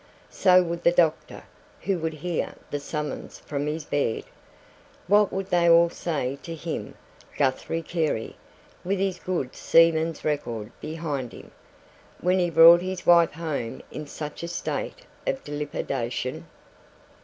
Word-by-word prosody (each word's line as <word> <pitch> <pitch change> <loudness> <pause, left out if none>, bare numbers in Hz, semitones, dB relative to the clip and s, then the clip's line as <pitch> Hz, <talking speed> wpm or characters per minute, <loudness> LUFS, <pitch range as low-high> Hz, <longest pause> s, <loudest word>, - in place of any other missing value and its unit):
So 185 -1 +5
would 170 0 -4
the 170 - +5
doctor, 165 -3 +1 0.4
who 195 -3 0
would 160 -1 -2
hear 175 -2 -2 0.2
the 145 - -1
summons 150 0 -5
from 145 0 -4
his 155 0 -3
bed. 140 -7 -1 0.8
What 205 +1 +4
would 195 0 -4
they 170 -1 +4
all 170 0 +6
say 140 -7 -3
to 165 - -6
him, 165 +1 -5 0.4
Guthrie 140 +4 0
Carey, 160 -10 -2 0.5
with 195 +3 0
his 190 -2 -1
good 170 -9 -3
seaman's 165 -1 +3
record 120 -7 -2
behind 150 -6 -4
him, - - -12 0.7
when 180 +2 +2
he 175 -1 +2
brought 165 +1 +8
his 185 -1 -4
wife 170 -1 +6
home 150 -8 -4
in 150 -1 -6
such 150 0 -7
a 170 - -4
state 335 - -4 0.2
of 270 - -1
dilapidation? 135 -4 -3
165 Hz, 140 wpm, -25 LUFS, 145-175 Hz, 0.8 s, brought